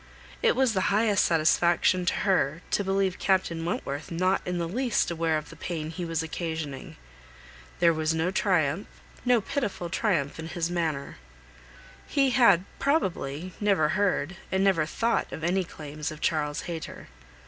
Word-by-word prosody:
It 470 - +3
was 260 -3 +3
the 190 -3 +1
highest 210 -1 +3
satisfaction 175 +2 +3
to - - +3
her 170 -5 +1
to 205 - +1
believe 195 -1 0
Captain 185 -4 +1
Wentworth 155 -2 -3
not 185 +3 +1
in 180 0 -1
the 170 -1 -1
least 240 +1 0
aware 165 -1 +1
of 150 -1 -7
the - - -11
pain 160 -3 -4
he 175 +1 -5
was 165 -1 -1
occasioning. 160 -4 -5 0.8
There 170 -1 +5
was 155 0 0
no 160 +3 0
triumph, 180 -3 +1 0.4
no 245 -2 +4
pitiful 205 - -3
triumph 170 -9 0
in 160 - -5
his 170 0 -2
manner. 160 -5 -2 0.9
He 275 -2 +2
had, 235 -8 +5
probably, 185 - -1
never 195 -7 +2
heard, 190 -3 0
and 190 0 +2
never 175 -6 +3
thought 230 +7 0
of 160 - -7
any 185 +3 +1
claims 150 -2 -6
of 155 -1 -8
Charles 150 -3 0
Hayter. 165 -2 -7
175 Hz, 160 wpm, -27 LUFS, 160-195 Hz, 0.9 s, There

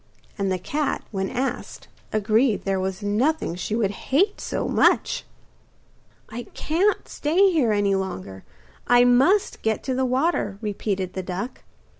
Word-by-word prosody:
And 195 -2 -1
the 185 - +1
cat, 290 - -2
when 195 -2 -2
asked, 260 +1 -4 0.2
agreed 215 +2 +2
there 195 -1 0
was 190 +2 -3
nothing 230 - 0
she 180 +5 -3
would 215 -4 +1 0.2
hate 385 +10 +2
so - - -2
much. - - +2 1.0
'I 235 0 -7
can't 370 +7 +1
stay 370 +6 +2
here 280 -10 +2
any 205 -1 +2
longer, 95 - -4 0.4
I 245 0 +6
Must 270 +12 +3
get 220 -1 -1
to 265 - -2
the 260 +1 0
water,' 255 - 0
repeated 200 -3 -3
the 190 - -3
duck. 185 +7 -5
220 Hz, 145 wpm, -24 LUFS, 195-270 Hz, 1.0 s, I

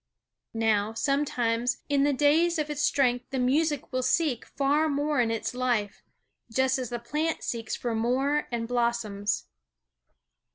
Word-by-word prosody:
Now, 220 -1 +1
sometimes, 245 -3 0
in 280 -1 +2
the 290 - +3
days 310 +5 +3
of 300 -1 -2
its 295 -1 -3
strength 250 -4 +1
the 270 - -3
music 285 +3 +1
will 255 - +1
seek 260 -1 0
far 290 +3 +1
more 290 -1 +1
in 230 - +1
its 225 +1 -2
life, 245 -5 -1 0.5
just 265 +2 +2
as 250 -3 -4
the 240 - -3
plant 300 +7 -2
seeks 230 -2 -3
for 240 -2 -3
more 260 +6 +1
and 230 -1 -2
blossoms. 235 -4 -1
255 Hz, 150 wpm, -27 LUFS, 235-290 Hz, 0.5 s, the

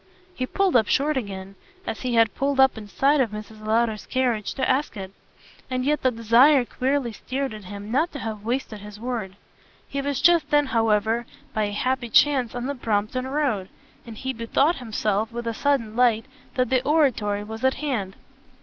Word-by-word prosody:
he 255 -5 -3
pulled 390 0 +1
up 220 -3 +4
short 295 +2 +1
again, 195 -5 -5 0.3
as - - -4
he 250 -2 -1
had 225 -2 +4
pulled 275 0 -1
up 265 0 +6
in 215 -2 -9
sight 275 +7 +2
of 240 - +1
Mrs. 215 +1 -9
Lowder's 220 0 0
carriage, 245 -5 -1
to 265 - 0
ask 265 -3 0
it. 190 -1 -6 0.6
And 255 0 -1
yet 300 +1 +1
the 260 - +3
desire 245 +4 +5
queerly 260 0 -1
stirred 265 +4 -4
in 215 - -8
him 205 +2 -8
not 310 +8 +1
to - - -5
have 220 -5 -5
wasted 230 -2 -3
his 210 0 -11
word. 225 -5 -4 0.5
He 280 - -3
was 280 -1 -2
just 340 +1 +4
then 295 0 +4
however 225 -1 +1 0.3
by 215 -1 +1
a 205 - -3
happy 255 +3 -1
chance 260 -1 +3
in 245 0 -3
the 280 - -2
Brompton 230 +1 -1
Road, 260 -9 -1 0.3
and 230 -2 -10
he 265 +2 -3
bethought 260 +8 +1
himself 220 -2 -1
with 235 0 -5
a 230 - -1
sudden 230 -4 0
light 235 -3 +3 0.3
that 255 0 0
the 255 -1 +3
Oratory 250 -9 +1
was 220 +2 -8
at 260 0 +3
hand. 230 -11 -3
240 Hz, 195 wpm, -24 LUFS, 215-270 Hz, 0.6 s, up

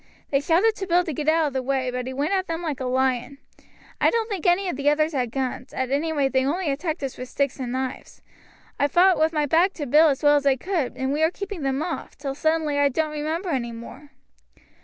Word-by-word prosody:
They 275 - +3
shouted 350 +9 +3
to 385 - -4
Bill 355 0 +3
to 325 -4 -4
get 295 +2 -4
out 320 0 +3
of 285 - -2
the 265 - -1
way, 260 -1 -1
but 250 0 -4
he 260 - -4
went 290 +7 0
at 380 -1 0
them 330 +1 -3
like 300 -4 -3
a 260 - -3
lion. 260 +1 0 0.6
I - - +5
don't 455 -1 0
think 375 -5 -2
any 365 +2 +3
of 355 - -2
the 285 +2 +2
others 310 +2 +1
had 250 -4 -1
guns; 255 0 -4
at 260 0 -2
any 305 +4 0
rate 280 -3 0
they 260 0 +3
only 310 +3 0
attacked 310 +2 -3
us 270 - -5
with 255 0 -6
sticks 280 -1 -1
and 250 -2 -4
knives. 260 0 -5 0.6
I 285 - +3
fought 360 +5 +4
with 315 +1 +3
my 300 -2 0
back 340 +6 +3
to 295 - -5
Bill 300 +5 +5
as 280 -2 0
well 290 0 +6
as 285 -1 0
I 270 - +5
could, 330 -1 -2
and 265 +1 -1
we 300 - -1
were 320 - +4
keeping 395 -1 -6
them 270 +1 -1
off, 335 -1 -5
till 275 -2 -4
suddenly 315 0 0
I 285 0 +4
don't 310 +3 -1
remember 315 +5 -3
any 245 -6 -1
more." 235 +5 -10
290 Hz, 255 wpm, -24 LUFS, 265-330 Hz, 0.6 s, well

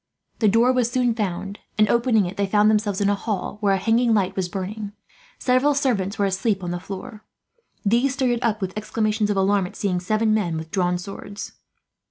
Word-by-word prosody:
The 220 - +3
door 230 +5 +4
was 250 -2 +1
soon 245 -1 +1
found 195 -2 -3 0.2
and, 215 0 +5
opening 235 -3 +3
it, 175 - -5
they 200 -1 0
found 210 +2 +4
themselves 210 -2 0
in 200 - +3
a - - +3
hall 205 -1 -3
where 200 -2 +3
a - - 0
hanging 230 +3 +2
light 195 -2 0
was 185 -2 -2
burning. 200 +3 -5 0.4
Several 260 +3 +2
servants 225 -8 0
were 200 - +2
asleep 195 +1 0
on 175 - -3
the 175 - -3
floor. 200 +4 -8 0.6
These 240 +6 +2
started 255 -3 +1
up, 220 -3 0
with 185 -1 -3
exclamations 215 0 -1
of 205 - 0
alarm, 195 -1 +2
at - - -13
seeing 185 -3 -1
seven 215 +4 +1
men 180 -7 0
with 160 0 -7
drawn 180 -2 +1
swords. 200 +2 -8
205 Hz, 205 wpm, -23 LUFS, 190-225 Hz, 0.6 s, and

